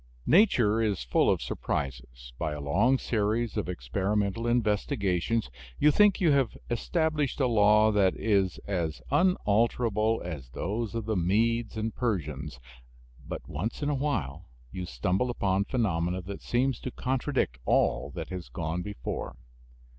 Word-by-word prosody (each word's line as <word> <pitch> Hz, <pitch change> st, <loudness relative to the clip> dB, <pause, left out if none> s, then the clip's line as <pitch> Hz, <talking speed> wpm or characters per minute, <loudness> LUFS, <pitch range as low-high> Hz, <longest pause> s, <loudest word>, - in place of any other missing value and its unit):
Nature 120 Hz, -, +4 dB
is 105 Hz, -, 0 dB
full -, -, +2 dB
of -, -, +1 dB
surprises. 60 Hz, -3 st, -4 dB
By 75 Hz, -, -1 dB
a 75 Hz, -, -5 dB
long 115 Hz, -, +2 dB
series 110 Hz, 0 st, -1 dB
of 105 Hz, -4 st, -2 dB
experimental 100 Hz, -, -1 dB
investigations 105 Hz, -2 st, 0 dB, 0.3 s
you 150 Hz, -, +5 dB
think 210 Hz, +5 st, +4 dB
you 170 Hz, -5 st, +4 dB
have 135 Hz, -4 st, +1 dB
established 155 Hz, +4 st, 0 dB
a 135 Hz, -, +3 dB
law 105 Hz, -2 st, +5 dB
that 100 Hz, -3 st, +3 dB
is 100 Hz, -5 st, +1 dB
as 85 Hz, -6 st, -2 dB
unalterable 115 Hz, -, +2 dB
as 75 Hz, -8 st, -6 dB
those 110 Hz, -, -3 dB
of 115 Hz, -2 st, -3 dB
the 110 Hz, -1 st, -1 dB
Medes 110 Hz, +5 st, +1 dB
and 110 Hz, 0 st, -2 dB
Persians. 75 Hz, -, -3 dB, 0.6 s
But -, -, -7 dB
once 110 Hz, -, -4 dB
in 145 Hz, -, 0 dB
a -, -, +1 dB
while 135 Hz, -, -2 dB, 0.2 s
you 90 Hz, -1 st, -5 dB
stumble 90 Hz, -, 0 dB
upon 100 Hz, -4 st, 0 dB
phenomena 90 Hz, -7 st, -1 dB
that 100 Hz, +2 st, -7 dB
seem 130 Hz, +3 st, +1 dB
to 130 Hz, -, -6 dB
contradict 130 Hz, -, -1 dB
all -, -, +2 dB
that -, -, -5 dB
has 90 Hz, -2 st, -6 dB
gone 85 Hz, 0 st, -3 dB
before. 90 Hz, -9 st, -5 dB
105 Hz, 145 wpm, -28 LUFS, 90-120 Hz, 0.6 s, you